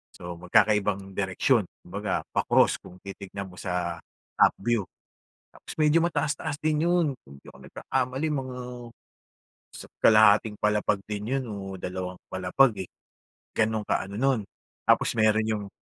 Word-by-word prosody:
So, 85 Hz, 0 st, -7 dB
magkakaibang 100 Hz, +1 st, +2 dB
direksyon 100 Hz, +5 st, +2 dB, 0.2 s
kumbaga 100 Hz, +1 st, -3 dB
pa-cross -, -, +4 dB
kung 90 Hz, -, -13 dB
titingnan 100 Hz, 0 st, -7 dB
mo -, -, -14 dB
sa 90 Hz, -2 st, -2 dB, 0.4 s
upview. 115 Hz, 0 st, +3 dB, 0.7 s
Tapos -, -, -10 dB
medyo 155 Hz, +1 st, +4 dB
mataas-taas 155 Hz, -2 st, -1 dB
din 155 Hz, 0 st, +1 dB
'yon, 175 Hz, -1 st, +3 dB, 0.2 s
kung 70 Hz, 0 st, -14 dB
di -, -, -20 dB
ako 65 Hz, -, -17 dB
nagkakamali 130 Hz, +3 st, -2 dB
mga 130 Hz, -3 st, -3 dB, 1.2 s
isa't -, -, -11 dB
kalahating 110 Hz, 0 st, +6 dB
palapag 105 Hz, -1 st, +2 dB
din 105 Hz, -1 st, -3 dB
'yon 130 Hz, -, -2 dB
o 105 Hz, -, -5 dB, 0.3 s
dalawang 90 Hz, 0 st, -4 dB
palapag, 95 Hz, +3 st, +2 dB
eh, -, -, -27 dB, 0.7 s
ganon 110 Hz, -1 st, +1 dB
ka-ano 100 Hz, +1 st, -2 dB
nun, 135 Hz, -2 st, +2 dB, 0.5 s
tapos -, -, +4 dB
meron 110 Hz, 0 st, +4 dB
yung 105 Hz, -2 st, -2 dB
105 Hz, 135 wpm, -26 LUFS, 95-130 Hz, 1.2 s, kalahating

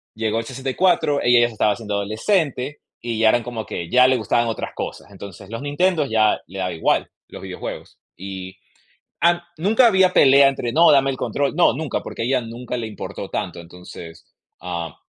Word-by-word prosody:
llegó 110 Hz, 0 st, -1 dB
el 115 Hz, -, -5 dB
64, 135 Hz, +4 st, 0 dB
ella 120 Hz, 0 st, +5 dB
ya 120 Hz, -, +4 dB
se 120 Hz, -, -10 dB
estaba 105 Hz, -1 st, +2 dB
haciendo 105 Hz, -1 st, -6 dB
adolescente 130 Hz, -, -1 dB, 0.2 s
y 115 Hz, -2 st, -4 dB
ya 110 Hz, -1 st, +5 dB
eran 120 Hz, +1 st, +2 dB
como 120 Hz, -2 st, -5 dB
que, 85 Hz, -4 st, -6 dB
ya 125 Hz, 0 st, +6 dB
le 130 Hz, 0 st, +3 dB
gustaban 120 Hz, +1 st, 0 dB
otras 115 Hz, -, -4 dB
cosas. -, -, -7 dB
Entonces 100 Hz, -1 st, -11 dB
los 115 Hz, -, -5 dB
Nintendo 155 Hz, +3 st, +1 dB
ya 110 Hz, -4 st, +2 dB
le 95 Hz, -, -10 dB
daba 90 Hz, -1 st, -2 dB
igual, 80 Hz, -, 0 dB, 0.2 s
los -, -, -11 dB
videojuegos. -, -, -8 dB, 0.2 s
Y, 95 Hz, 0 st, -8 dB, 0.6 s
am 175 Hz, 0 st, +3 dB, 0.2 s
nunca 215 Hz, +9 st, +4 dB
había 190 Hz, -4 st, +4 dB
pelea 140 Hz, 0 st, +6 dB
entre: 125 Hz, -3 st, -3 dB
"No, 165 Hz, +4 st, +5 dB
dame 135 Hz, -1 st, +4 dB
el 135 Hz, -, -3 dB
control". 140 Hz, +2 st, -2 dB
No, 175 Hz, -, +4 dB
nunca, 155 Hz, -3 st, -3 dB
porque -, -, -7 dB
a -, -, 0 dB
ella 130 Hz, 0 st, +1 dB
nunca 120 Hz, +2 st, -6 dB
le 115 Hz, -, -4 dB
importó 110 Hz, -, -7 dB
tanto, -, -, -4 dB
entonces, 85 Hz, -1 st, -12 dB, 0.4 s
ah, 85 Hz, -3 st, -5 dB
120 Hz, 195 wpm, -21 LUFS, 100-140 Hz, 0.6 s, ya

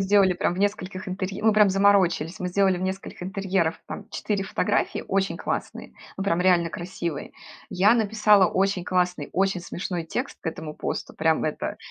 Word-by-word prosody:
сделали 195 Hz, -1 st, +4 dB
прям 175 Hz, 0 st, -1 dB
в -, -, -7 dB
нескольких 195 Hz, -2 st, -2 dB
интер 185 Hz, 0 st, -3 dB
мы 220 Hz, 0 st, +5 dB
прям 210 Hz, -1 st, +5 dB
заморочились! 190 Hz, -4 st, +3 dB
Мы 180 Hz, -, -3 dB
сделали 190 Hz, 0 st, +2 dB
в -, -, -5 dB
нескольких 190 Hz, -1 st, -5 dB
интерьеров 190 Hz, -3 st, -1 dB
там -, -, -7 dB
4 200 Hz, -2 st, -2 dB
фотографии, 205 Hz, +2 st, -1 dB
очень 195 Hz, 0 st, 0 dB
классные, -, -, -4 dB, 0.2 s
ну, 195 Hz, -, -3 dB
прям 175 Hz, -3 st, +1 dB
реально 175 Hz, -2 st, +3 dB
красивые. 170 Hz, -3 st, -5 dB, 0.4 s
Я 195 Hz, +4 st, +4 dB
написала 215 Hz, -3 st, +4 dB
очень 190 Hz, 0 st, 0 dB
классный, 180 Hz, -1 st, 0 dB
очень 195 Hz, -1 st, +1 dB
смешной 175 Hz, -1 st, -4 dB
текст 245 Hz, -, -4 dB
к -, -, -10 dB
этому 160 Hz, -1 st, -5 dB
посту, -, -, -4 dB
прям 160 Hz, 0 st, +1 dB
это, 155 Hz, -, -3 dB
190 Hz, 170 wpm, -25 LUFS, 180-200 Hz, 0.4 s, мы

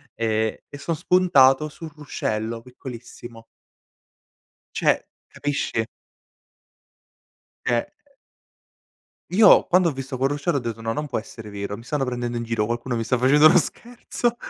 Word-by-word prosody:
e 110 Hz, -1 st, -1 dB
e 145 Hz, -, -10 dB
son 165 Hz, +3 st, -2 dB
spuntato 155 Hz, -5 st, +4 dB
sul 160 Hz, +1 st, -10 dB
ruscello 115 Hz, -6 st, -4 dB
piccolissimo. 120 Hz, -2 st, -11 dB, 1.3 s
Cioè -, -, +2 dB, 0.3 s
capisci? 140 Hz, -6 st, -2 dB, 1.8 s
Cioè, 120 Hz, -, +2 dB
ehm 115 Hz, -, 0 dB, 1.5 s
Io 205 Hz, +2 st, +7 dB
quando 180 Hz, -2 st, +4 dB
ho -, -, -5 dB
visto 135 Hz, 0 st, -6 dB
col 135 Hz, +2 st, +2 dB
ruscello, 145 Hz, +3 st, -1 dB
ho -, -, 0 dB
detto: 115 Hz, -2 st, -5 dB
"No 115 Hz, 0 st, -2 dB
non 150 Hz, +6 st, -3 dB
può -, -, -4 dB
essere 110 Hz, -1 st, -11 dB
vero, 100 Hz, 0 st, -5 dB
mi 115 Hz, -, -13 dB
stanno 140 Hz, +1 st, -1 dB
prendendo 120 Hz, -1 st, -3 dB
in 120 Hz, -, -2 dB
giro, 115 Hz, -2 st, -1 dB
qualcuno 120 Hz, +2 st, -3 dB
mi 115 Hz, -, -2 dB
sta 120 Hz, +3 st, +1 dB
facendo 140 Hz, +5 st, +5 dB
uno 155 Hz, -, +7 dB
scherzo. 240 Hz, +5 st, -3 dB
125 Hz, 145 wpm, -23 LUFS, 115-150 Hz, 1.8 s, Io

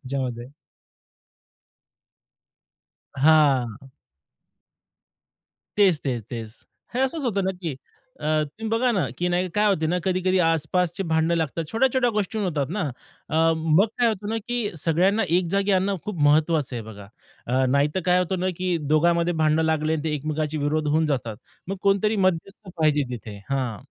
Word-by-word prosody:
त्याच्यामध्ये. 130 Hz, -3 st, -4 dB, 2.7 s
हां. 135 Hz, -4 st, +3 dB, 1.9 s
तेच, 185 Hz, -7 st, +4 dB
तेच, 120 Hz, -4 st, -2 dB
तेच. 115 Hz, -2 st, -6 dB, 0.4 s
हे 250 Hz, -, -1 dB
असंच 275 Hz, +3 st, 0 dB
होतं 200 Hz, -4 st, 0 dB
ना, 190 Hz, -, 0 dB
की 160 Hz, -6 st, -3 dB, 0.4 s
अ, -, -, -7 dB, 0.2 s
तुम्ही 210 Hz, +10 st, -7 dB
बघा 240 Hz, +2 st, +2 dB
ना, 195 Hz, -, +1 dB, 0.2 s
की 180 Hz, -, 0 dB
नाही 180 Hz, +1 st, 0 dB
काय 210 Hz, -, +3 dB
होतं 160 Hz, -6 st, +1 dB
ना 180 Hz, -, +1 dB
कधी-कधी 185 Hz, 0 st, +1 dB
आसपासचे 165 Hz, +3 st, 0 dB
भांड 160 Hz, +1 st, +2 dB
लागतात, 165 Hz, 0 st, -1 dB
छोट्या-छोट्या 255 Hz, +1 st, +2 dB
गोष्टी 210 Hz, +1 st, -2 dB
होतात 155 Hz, -8 st, -1 dB
ना. -, -, 0 dB, 0.5 s
अ, 155 Hz, -, -2 dB, 0.2 s
मग 160 Hz, +5 st, +3 dB
काय 240 Hz, -, +4 dB
होतं 210 Hz, -2 st, -2 dB
ना, 225 Hz, -, -1 dB
की 240 Hz, -3 st, -1 dB
सगळ्यांना 185 Hz, +7 st, +2 dB
एक 180 Hz, -1 st, +1 dB
जागी 200 Hz, +1 st, +1 dB
आणणं, 195 Hz, +1 st, +2 dB
खूप 195 Hz, -7 st, -4 dB
महत्त्वाचं 150 Hz, -2 st, +2 dB
आहे 115 Hz, -, -3 dB
बघा. 105 Hz, -2 st, -10 dB, 0.4 s
अ, 130 Hz, +2 st, +2 dB
नाहीतर 145 Hz, +5 st, +1 dB
काय 180 Hz, 0 st, +4 dB
होतं 180 Hz, 0 st, -1 dB
ना, 185 Hz, -, 0 dB
की 180 Hz, -2 st, 0 dB, 0.2 s
दोघांमध्ये 170 Hz, +2 st, +3 dB
भांड 155 Hz, 0 st, +3 dB
लागले 160 Hz, -1 st, +1 dB
आणि 155 Hz, -2 st, -2 dB
ते 155 Hz, -1 st, -1 dB
एकमेकांचे 155 Hz, +1 st, -2 dB
विरोध 150 Hz, +1 st, -1 dB
होऊन 155 Hz, +2 st, +2 dB
जातात, 120 Hz, -7 st, -2 dB, 0.3 s
मग 195 Hz, -, -3 dB
कोणतरी 200 Hz, +2 st, +2 dB
मध्यस्थ 185 Hz, +3 st, -2 dB
पाहिजे 150 Hz, -2 st, +2 dB
तिथे. 110 Hz, -4 st, -7 dB
हां, 130 Hz, -6 st, -1 dB
160 Hz, 155 wpm, -24 LUFS, 145-195 Hz, 2.7 s, तेच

